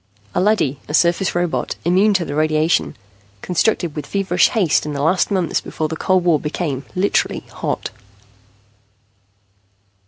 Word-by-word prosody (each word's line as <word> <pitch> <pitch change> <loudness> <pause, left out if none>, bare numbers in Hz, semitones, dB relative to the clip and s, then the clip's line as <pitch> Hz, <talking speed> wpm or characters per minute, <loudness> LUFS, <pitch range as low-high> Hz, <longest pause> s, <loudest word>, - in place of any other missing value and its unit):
A 180 - +1
leady, 185 -10 +1
a 150 - -1
surface 175 +2 +2
robot, 175 -1 -1
immune 195 +4 +3
to 180 -3 +1
radiation, 155 +1 0 0.5
constructed 180 -2 0
with 150 -3 -5
feverish 195 -1 +2
haste 195 - +2
in 150 - -4
the 140 - -3
last 180 +4 +2
months 185 -5 0
before 155 - -3
the 160 - -3
cold 185 +2 +1
war 170 -4 +3
became 150 -3 -3
literally 190 +2 0
hot. - - -4
170 Hz, 135 wpm, -19 LUFS, 155-185 Hz, 0.5 s, immune